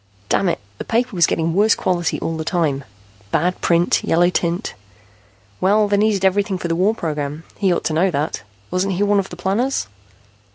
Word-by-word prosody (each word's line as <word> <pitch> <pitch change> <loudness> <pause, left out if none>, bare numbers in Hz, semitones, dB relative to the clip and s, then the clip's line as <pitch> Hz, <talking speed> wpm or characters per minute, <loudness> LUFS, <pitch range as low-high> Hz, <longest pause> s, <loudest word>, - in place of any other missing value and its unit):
Damn 195 - +2
it, - - -1 0.2
the - - -3
paper 235 -1 -1
was 170 -2 +4
getting 165 0 0
worse 210 +4 +4
quality 175 -3 -1
all 165 - -2
the 160 - -3
time, 155 -5 0 0.5
bad 180 - 0
print, 170 0 +2
yellow 175 +2 +3
tint 170 0 -1 0.9
Well, 210 +3 +3
they 205 0 +2
needed 205 -2 +2
everything 195 0 +1
for 180 - -4
the 165 - 0
war 195 +6 +2
program. 150 -3 -4 0.2
He 195 -3 +2
ought 175 - 0
to 155 - -1
know 175 +5 +3
that. 150 -1 -2 0.3
Wasn't 190 +2 0
he 200 - +1
one 205 0 +3
of 195 - -3
the 175 - -9
planners? 210 +9 0
180 Hz, 195 wpm, -20 LUFS, 165-200 Hz, 0.9 s, was